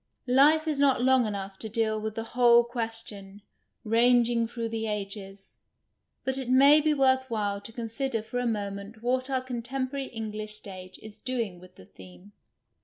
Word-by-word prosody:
Life 295 +5 +4
is 300 -3 0
not 270 -3 +3
long 260 -2 +4
enough 195 -2 -5
to 220 - -6
deal 220 0 0
with 220 0 -4
the 225 - -3
whole 240 0 +5
question, 225 -4 -5 0.4
rang 240 +2 +4
ing 230 -1 0
through 230 0 -4
the 225 0 -3
ages, 195 -1 -6 0.6
but 265 0 0
it 255 -2 -5
may 280 +4 +7
be 310 +1 +2
worth 260 -2 +2
while 205 -3 -2
to 205 - -10
consider 230 +1 -3
for 245 +3 -4
a 245 - -1
moment 205 0 -4
what 255 +2 0
our 260 -1 0
contemporary 260 +2 -4
Eng 225 -2 -5
lish 215 0 -5
stage 185 -3 -10
is 215 -1 -12
doing 230 -8 -3
with 185 0 -16
the 95 - -15
theme. 95 +1 -15
230 Hz, 180 wpm, -27 LUFS, 210-255 Hz, 0.6 s, may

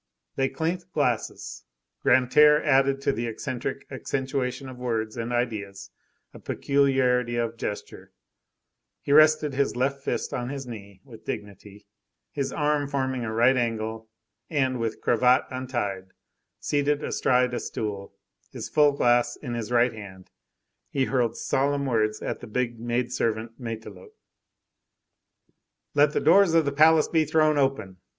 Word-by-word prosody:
They 135 0 +1
clinked 170 +6 -3
glasses. 125 -7 -2 0.4
Grantaire 150 +4 +5
added 135 0 +2
to 140 0 +1
the 120 -3 -3
eccentric 125 +3 -5
accentuation 130 0 -3
of 130 -1 -10
words 110 -3 -2
and 115 0 -4
ideas, 100 -5 -3 0.4
a - - -11
peculiarity 130 -4 +1
of 115 -1 -2
gesture; 105 -3 -6 0.9
he - - -3
rested 155 -1 +5
his 140 -1 0
left 135 +2 -1
fist - - -3
on 120 0 -3
his 135 -1 -5
knee 100 -5 -10
with 120 -5 -14
dignity, 100 0 -8 0.5
his 140 -2 -3
arm 150 -1 0
forming 130 -3 -2
a 110 - -3
right 120 +4 +4
angle, 110 -2 -2 0.4
and, 130 -5 0
with 115 -1 -3
cravat 125 +2 +3
untied, 120 -8 -4 0.5
seated 145 0 0
astride 125 0 +1
a 120 - -1
stool, 100 -2 -5 0.4
his - - -7
full 150 -2 +4
glass 120 -3 +2
in 125 -5 -7
his 115 0 -4
right 120 0 +3
hand, 95 -4 -11 0.6
he 135 -1 0
hurled 125 -4 0
solemn 140 +1 0
words 110 -4 0
at - - -3
the - - -10
big 120 +1 -2
maid 120 +1 -2
servant 115 +1 -2
Matelote:— 110 -5 -8 1.8
"Let 145 0 +4
the - - +1
doors 175 0 +5
of 165 -2 +4
the 140 - 0
palace 155 +2 +5
be 160 -2 +2
thrown 155 -1 +2
open! 120 -9 -1
125 Hz, 145 wpm, -25 LUFS, 115-140 Hz, 1.8 s, Grantaire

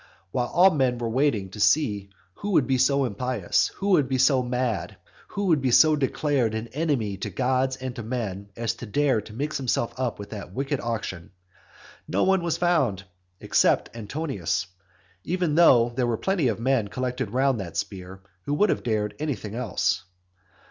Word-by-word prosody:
While 120 +3 0
all 185 +7 +5
men 130 -5 +1
were 115 -1 -3
waiting 115 -7 +1
to 105 - -9
see 105 -6 +2 0.2
who 205 - -4
would 145 - +4
be 130 0 +1
so 140 +1 +3
impious, 120 -3 0
who 200 - -2
would 150 -9 +3
be 130 - +1
so 130 0 +4
mad, 125 -5 -2 0.3
who 200 - -3
would 160 -6 +3
be 130 - +1
so 155 +5 +6
declared 135 -4 0
an 110 +1 -4
enemy 135 -10 -1
to - - -4
gods 130 +1 0
and 130 -1 -6
to - - -5
men 105 -4 -4
as 115 -1 -1
to 120 - -8
dare 135 0 +2
to 110 - -13
mix 145 +6 -2
himself 125 -3 -1
up 125 -3 -1
with 100 0 -9
that 100 -4 -8
wicked 135 +3 -2
auction, 110 -7 -4 0.8
no 95 - +1
one 190 -1 +3
was 170 -1 -1
found 165 - +1 0.4
except - - +2
Antonius, 105 - -2 0.6
even 175 -3 -1
though 130 -8 +6
there 120 +1 -1
were 115 -2 0
plenty 185 - 0
of 115 -2 -1
men 125 -3 +1
collected 125 +1 -3
round 130 +1 +1
that 85 -4 -6
spear 95 -1 -5 0.2
who 145 - 0
would 205 +6 +3
have - - -1
dared 105 -3 -1
anything 125 -9 -3
else. 105 -4 -1
125 Hz, 185 wpm, -25 LUFS, 110-145 Hz, 0.8 s, so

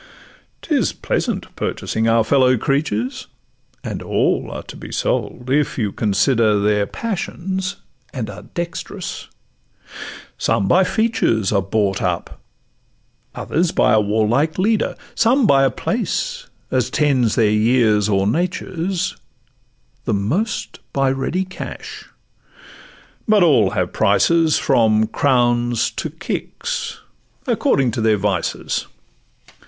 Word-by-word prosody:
'Tis - - +1
pleasant - - -3
purchasing 110 0 -2
our 115 0 +4
fellow 130 0 +3
creatures; 130 -2 -1 0.6
And - - -4
all - - 0
are - - -6
to - - -11
be - - -9
sold, 125 +1 -2
if 145 +1 +1
you 105 -5 0
consider 105 +1 +2
Their 105 0 +1
passions, 190 -2 -3 0.4
and 120 -5 -4
are 105 0 -8
dext'rous; 170 -1 -6 1.1
some 100 - +1
by 185 - +4
features 180 - +1
Are 100 -2 +2
bought 100 0 0
up, 90 -1 -2 1.0
others 170 +1 0
by - - +3
a 110 - +5
warlike 110 +9 +1
leader, 210 +3 +1 0.2
Some 250 +3 +3
by 140 -7 +5
a 135 - +4
place—as 130 +1 -3
tend 140 -5 +2
their 110 -3 +3
years 110 -1 +3
or 95 -1 +2
natures; 180 - -1 0.9
The 110 - +1
most 170 - -2
by 135 -1 +2
ready 135 +8 -1
cash—but 215 - -5
all 130 - +4
have 95 -3 -2
prices, 155 +10 +3
From 110 -4 +3
crowns 120 -2 +1
to - - -4
kicks, - - -4 0.5
according 130 -3 +2
to 115 0 -3
their 110 -1 +3
vices. 100 -1 -2
125 Hz, 115 wpm, -20 LUFS, 105-165 Hz, 1.1 s, a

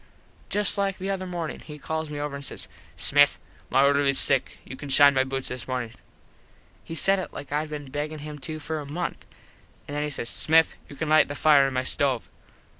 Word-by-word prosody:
Just 205 0 +2
like 195 -1 0
the 195 +1 -3
other 185 -1 -3
mornin 170 -3 -5
he 150 -1 -10
calls 160 +1 -4
me 145 -1 -5
over 145 -1 -4
an 140 - -7
says, 140 - -3 0.3
"Smith, 145 0 +4 0.3
my 135 +2 +4
orderlies 140 -1 +3
sick. 135 -3 +1
You - - -8
can 145 +1 -9
shine 140 +1 +8
my 130 -1 +3
boots 135 0 -3
this 125 -1 -6
mornin." 125 -3 -3 0.9
He 165 - -7
said 195 +5 +3
it 185 - -6
like 145 - -9
Id 150 +1 -1
been 145 -3 -7
beggin 150 +2 -4
him 150 0 -8
to 155 +3 -5
for 155 +1 -4
a 145 - -7
month. 175 +3 -4 0.6
An 145 - -7
then 145 - -2
he 150 - -2
says, 120 -5 -3
"Smith 160 +1 +3 0.2
you 145 - -10
can 160 - -3
lite 155 +1 +5
the 145 - -6
fire 145 -2 +5
in 135 - -5
my 130 - 0
stove." 130 -2 +1
145 Hz, 220 wpm, -25 LUFS, 140-160 Hz, 0.9 s, shine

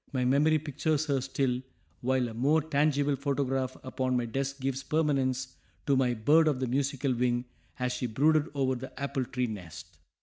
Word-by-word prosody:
My 130 -2 0
memory 145 +5 +4
pictures 155 +1 -1
her 140 -3 0
still, 130 -1 -1 0.4
while 130 0 +1
a 115 - -7
more 140 +7 +3
tangible 145 -1 +2
photograph 135 -2 -1
upon 130 -1 -1
my 120 - 0
desk 135 +4 -3
gives 135 0 -2
permanence 135 -4 0 0.3
to 140 - +3
my 125 -2 +2
"bird 150 +9 +4
of 145 -4 +1
the 130 - 0
musical 135 +1 0
wing" 120 0 0 0.3
as 125 -1 -1
she 125 0 -2
brooded 150 +7 +2
over 135 -1 +1
the 130 +1 -7
apple 140 -2 -2
tree 125 0 -1
nest. 100 -8 -8
135 Hz, 175 wpm, -29 LUFS, 125-145 Hz, 0.4 s, memory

